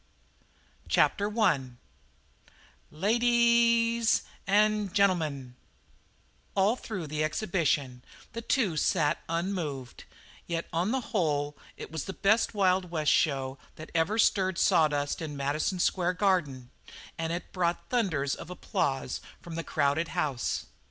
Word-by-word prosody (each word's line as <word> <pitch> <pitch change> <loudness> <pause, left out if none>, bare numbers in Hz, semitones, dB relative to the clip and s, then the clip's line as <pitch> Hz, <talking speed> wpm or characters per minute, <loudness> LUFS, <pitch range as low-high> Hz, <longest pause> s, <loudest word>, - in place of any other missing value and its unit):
CHAPTER 205 - +3
I 215 -7 +3 1.3
"LA 160 +6 -4
A 225 - +4
A - - -4
DIES 235 -1 +3 0.2
AN' 210 0 +2
GEN'L'MUN" 160 - 0 1.0
All 200 +4 +3
through 205 -9 -6
the 155 +1 -2
exhibition 155 - -1 0.3
the 230 - -4
two 220 - 0
sat 155 -3 +1
unmoved; 165 -7 -3 0.4
yet 170 -1 -3
on 175 +5 +1
the 260 +2 0
whole 145 -6 0 0.2
it - - -8
was 160 -3 -4
the 190 - -5
best 215 +3 +2
Wild 185 -2 +2
West 155 -3 +1
show 135 -3 +1 0.2
that 155 - -10
ever 170 +6 +1
stirred 190 -4 +2
sawdust 145 -2 +2
in 150 -3 -5
Madison 145 +6 -1
Square 180 0 +1
Garden 150 -11 0 0.5
and 165 0 -2
it 170 +1 -5
brought 175 -2 -1
thunders 160 - 0
of - - -8
applause 135 -6 -2 0.2
from 170 - -10
the 165 0 -3
crowded 150 +2 0
house. 140 -8 -1
170 Hz, 130 wpm, -29 LUFS, 150-205 Hz, 1.3 s, A